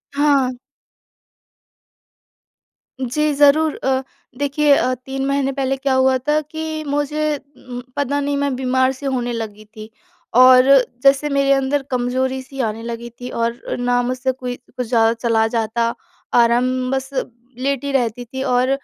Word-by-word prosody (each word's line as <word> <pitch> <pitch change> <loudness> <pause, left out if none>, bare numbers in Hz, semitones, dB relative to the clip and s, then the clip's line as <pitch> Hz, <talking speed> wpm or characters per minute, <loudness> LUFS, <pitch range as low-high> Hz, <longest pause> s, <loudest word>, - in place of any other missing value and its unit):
हाँ। 280 -3 +3 2.5
जी 295 +4 0
ज़रूर 295 +2 +4
अ, 265 0 +1 0.4
देखिए 285 +1 +3
अ, 255 -1 +1
3 265 +2 -5
महीने 275 0 0
पहले 270 0 -1
क्या 270 0 0
हुआ 260 0 +3
था 295 +4 +1
कि 315 +1 -5
मुझे 295 +1 0 0.3
उम, 245 0 -6
पता 285 0 0
नहीं 285 0 -1
मैं 280 -2 0
बीमार-सी 260 +1 0
होने 245 -3 -1
लगी 215 -2 -6
थी। 215 0 -12 0.5
और 255 0 +8 0.4
जैसे 275 +2 +4
मेरे 275 0 +2
अंदर 270 +1 +1
कमज़ोरी-सी 260 +2 -2
आने 220 0 -3
लगी 235 0 -6
थी 250 - -5
और 230 0 -2 0.2
ना 245 0 +1
मुझसे 255 +1 -1
कोई 250 -1 -5
कुछ 250 -1 -7
ज़्यादा 225 -1 +3
चला 230 -1 +1
जाता 230 +1 0 0.4
आराम 250 +2 +2
बस 265 0 -2 0.5
लेटी 275 +2 -2
ही 280 - -3
रहती 245 -2 -1
थी 265 +3 -5
और 250 0 +1
260 Hz, 145 wpm, -19 LUFS, 245-280 Hz, 2.5 s, और